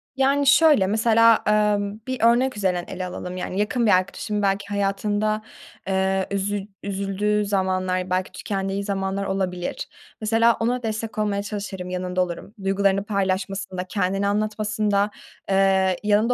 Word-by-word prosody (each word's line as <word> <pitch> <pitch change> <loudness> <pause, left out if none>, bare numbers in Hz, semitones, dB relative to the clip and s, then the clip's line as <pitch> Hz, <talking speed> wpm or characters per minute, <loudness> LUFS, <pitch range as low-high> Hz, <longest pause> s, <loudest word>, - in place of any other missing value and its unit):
Yani, 275 +1 +2
şöyle, 295 -8 +6
mesela, 225 +2 +4
ımm, 210 0 +1
bir 260 0 -3
örnek 240 +1 +3
üzerinden 180 -3 0
ele 185 0 -5
alalım, 180 0 -6
yani, 185 +1 -3
yakın 230 +3 +1
bir 210 - +4
arkadaşımın 200 +3 0
belki 200 0 0
hayatında, 205 +1 0 0.5
eee 190 0 +1
üzü 200 0 -2 0.2
üzüldüğü 200 +1 -1
zamanlar, 185 -2 0
belki 185 0 -1
tükendiği 195 +1 -3
zamanlar 195 0 -2
olabilir. 185 -2 -3 0.3
Mesela 225 +2 +3
ona 245 +2 0
destek 220 0 -4
olmaya 205 -1 0
çalışırım, 200 -3 -5
yanında 180 0 -2
olurum. 180 +3 -4
Duygularını 195 0 +2
paylaşmasında, 195 -2 -2
kendini 195 +1 -1
anlatmasında, 210 0 0 0.4
eee, 190 -1 +3
yanında 210 +3 +3
200 Hz, 130 wpm, -23 LUFS, 190-215 Hz, 0.5 s, şöyle